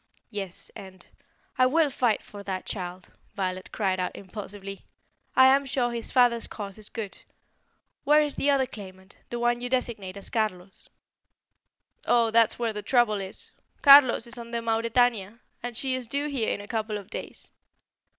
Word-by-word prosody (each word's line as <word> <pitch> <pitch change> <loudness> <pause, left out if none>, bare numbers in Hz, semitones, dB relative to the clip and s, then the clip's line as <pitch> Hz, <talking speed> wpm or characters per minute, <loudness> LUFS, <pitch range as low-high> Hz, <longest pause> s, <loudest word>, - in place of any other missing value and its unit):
"Yes, 195 -4 -5
and 185 -2 -11 0.3
" - - -37
"I 255 - +6
will 305 +2 +3
fight 245 -4 +1
for 205 - -10
that 190 -2 -4
child!" 180 -2 -6 0.2
Violet 185 -2 -3
cried 190 -3 0
out 180 - -2
impulsively. 195 0 -8 0.5
"I 260 - +8
am 270 +1 +5
sure 250 -3 -1
his 235 -1 -4
father's 245 -2 +3
cause 200 -1 -7
is 210 - -11
good. 215 -4 -6 0.8
Where 300 +1 +5
is 295 -2 +1
the 285 - 0
other 275 -2 +3
claimant 190 -5 -12
the 240 - -4
one 240 0 +1
you 245 - -3
designate 225 -7 -2
as 200 - -7
Carlos?" 195 -5 -3 1.2
"Oh, 235 -2 +4
there's 230 -1 +4
where 230 -2 -1
the 210 - -4
trouble 225 -4 +2
is! 190 +1 -5 0.3
Carlos 275 -4 +8
is 235 +1 -7
on 235 0 -8
the 235 - -2
Mauretania, 230 -2 +1 0.2
and 240 -1 -5
she 265 -1 0
is 255 -2 -3
due 280 +5 -1
here 260 -6 0
in - - -3
a 205 - -11
couple 215 -1 -2
of 200 -2 -11
days. - - -7
225 Hz, 175 wpm, -27 LUFS, 195-245 Hz, 1.2 s, I